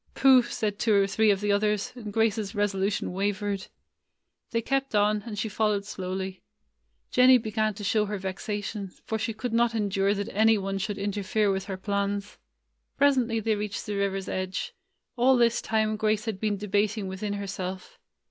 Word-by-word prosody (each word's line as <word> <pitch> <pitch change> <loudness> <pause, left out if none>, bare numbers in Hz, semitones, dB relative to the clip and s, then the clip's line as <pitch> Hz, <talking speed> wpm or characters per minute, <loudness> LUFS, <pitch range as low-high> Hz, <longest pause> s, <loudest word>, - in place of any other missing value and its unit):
"Pooh!" 265 -2 +7
said 215 -3 -3
two 220 -3 +3
or 200 -1 +5
three 215 +2 +2
of 200 -1 +2
the 205 0 +1
others, 210 0 +1
and 220 -4 -7
Grace's 220 -1 0
resolution 200 -2 0
wavered. 200 0 -2 0.8
They 230 - 0
kept 270 -2 -1
on, 210 0 +3
and 210 -2 -5
she 215 - -1
followed 210 -1 0
slowly. 190 -1 -5 0.7
Jennie 255 0 +7
began 215 -2 -1
to 205 - -8
show 210 +1 +2
her 210 0 -3
vexation, 200 +1 -4 0.2
for 220 -2 -2
she 225 - -1
could 225 +2 -4
not 235 0 +2
endure 200 -1 +1
that 200 0 -4
any 220 +1 +5
one 195 0 -3
should 205 +1 -3
interfere 205 +1 0
with 190 0 -2
her 195 -2 -5
plans. 200 +1 -2 0.6
Presently 255 -5 +3
they 220 0 +1
reached 210 -1 -4
the 210 - -3
river's 195 -1 -1
edge. 185 0 -3 0.4
All 255 +2 +5
this 235 -1 +3
time 215 -1 0
Grace 215 0 0
had 220 -4 -3
been 210 -1 0
debating 205 +1 0
within 190 +2 -4
her 200 0 -4
self. 185 -1 -6
205 Hz, 175 wpm, -27 LUFS, 195-220 Hz, 0.8 s, Pooh